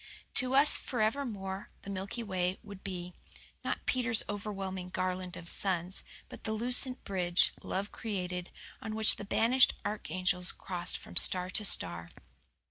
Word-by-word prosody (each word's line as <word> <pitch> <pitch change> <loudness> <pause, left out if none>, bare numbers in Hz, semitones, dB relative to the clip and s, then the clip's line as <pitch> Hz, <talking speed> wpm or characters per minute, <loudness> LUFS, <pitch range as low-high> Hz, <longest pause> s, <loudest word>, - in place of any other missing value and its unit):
To 255 +1 +2
us 280 +2 +6
forevermore 215 -5 -2
the 200 - -6
Milky 195 +5 -4
Way 185 -3 -1
would 200 -2 -11
be, 180 -2 -6 0.5
not - - -3
Peter's 250 -3 +1
overwhelming 195 -3 -5
garland 185 0 -3
of 175 -1 -10
suns, 180 0 0 0.2
but - - -12
the 220 - -2
lucent 250 +3 +2
bridge, 180 -2 +2
love 200 +2 -3
created, 180 -4 -4 0.3
on 215 -1 -5
which 220 0 +8
the 205 - -7
banished 240 +5 +4
archangels 185 -3 -1
crossed 180 -1 -3
from - - -10
star 180 0 +4
to 210 - +1
star. 85 - +3
195 Hz, 140 wpm, -31 LUFS, 180-220 Hz, 0.5 s, which